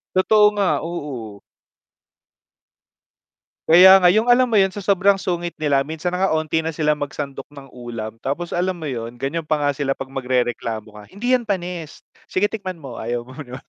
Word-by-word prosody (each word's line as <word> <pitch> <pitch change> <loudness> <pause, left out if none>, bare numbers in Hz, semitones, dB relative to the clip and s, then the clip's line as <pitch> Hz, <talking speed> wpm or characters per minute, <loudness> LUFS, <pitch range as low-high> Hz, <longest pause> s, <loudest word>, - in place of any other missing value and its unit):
Totoo 210 +3 +5
nga, 200 -2 +2
oo. 130 -11 -6 2.3
Kaya 190 +3 +9
nga, 180 - +3
'yung 225 +3 +2
alam 255 +1 +5
mo 235 - -3
'yun, 195 -2 +4
sa 195 - -9
sobrang 200 0 +2
sungit 175 -2 -3
nila 145 -3 +2
minsan 160 +5 -4
na 180 - -2
nga 195 - +2
'onti 160 +1 -1
na 160 - -2
sila 150 -1 +1
magsandok 140 -1 -6
ng 140 -2 -12
ulam 120 -3 -7
tapos 165 +6 -3
alam 180 0 -1
mo 160 - -6
'yon, 120 -3 -5
ganiyan 140 +6 -2
pa 155 0 -1
nga 145 -1 0
sila 140 0 -2
'pag 135 0 -3
magrereklamo 120 -4 -2
ka, 105 - -11
"Hindi 245 +6 0
'yan 250 - +2
panis, 180 -6 -4 0.3
sige 195 +2 +2
tikman 195 -4 -6
mo," 135 -6 -9
ayaw 120 +1 -4
mo 130 - -13
'no. 130 -3 -8
155 Hz, 185 wpm, -21 LUFS, 135-185 Hz, 2.3 s, Kaya